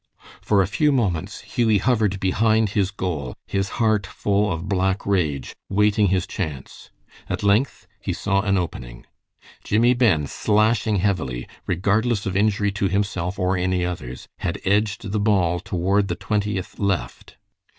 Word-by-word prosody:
For 100 -2 +3
a - - -2
few 150 +9 +2
moments 100 - -1
Hughie 110 -3 +1
hovered 105 -4 +1
behind 110 +3 +2
his 100 -3 +1
goal, 85 - -4
his 95 -1 -1
heart 110 -4 +2
full 100 +1 0
of 80 +2 -4
black 95 0 0
rage, 80 -9 -1
waiting 105 +1 +3
his 95 -1 +1
chance. 75 -7 -6 0.4
At - - -3
length 100 +1 +1
he 100 - -3
saw 95 +2 0
an 100 -1 +1
opening. - - -5 0.6
Jimmie 115 +4 +3
Ben, 110 - +3
slashing 110 - +1
heavily, 90 -11 -1 0.2
regardless 100 +5 +1
of 95 - -2
injury 105 0 +2
to 100 0 0
himself 95 -1 -1
or 95 0 +1
any 90 0 0
others, 65 -8 -6
had - - -3
edged 105 0 0
the 105 - 0
ball 95 -5 +2
toward 95 +3 0
the 85 - -2
Twentieth 105 -2 -2
left. 95 -12 -2
100 Hz, 150 wpm, -23 LUFS, 90-105 Hz, 0.6 s, For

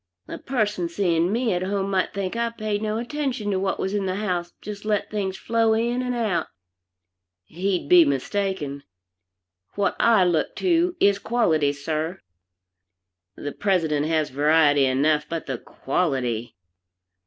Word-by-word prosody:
A - - -7
person 210 -9 -1
seeing 170 -1 +1
me 230 -1 +1
at 180 - -1
home 195 +1 -1
might 190 -1 +1
think 195 +1 -3
I 235 0 0
paid 215 -2 -3
no 215 0 -1
attention 245 -3 -2
to 190 - 0
what 190 0 -1
was 190 - -2
in 200 -2 -1
the 185 - -1
house, 180 -4 -2
just 205 0 -8
let 210 -1 -1
things 195 -3 -2
flow 225 -1 +1
in 235 +3 0
and 250 -1 -2
out. 205 -9 0 1.0
He'd 180 - -2
be 175 +2 +8
mistaken. 145 +1 -2 0.9
What 200 -2 0
I 225 -5 +5
look 175 -3 0
to 350 0 +1
is 200 0 +4
quality, 165 -12 +2
sir. 155 +4 -3 1.2
The 145 - -5
President 160 -7 0
has 155 -3 0
variety 145 0 +4
enough, 150 +3 +1
but 165 -2 -4
the 130 -4 -4
quality! 130 -7 -2
190 Hz, 150 wpm, -24 LUFS, 155-215 Hz, 1.2 s, be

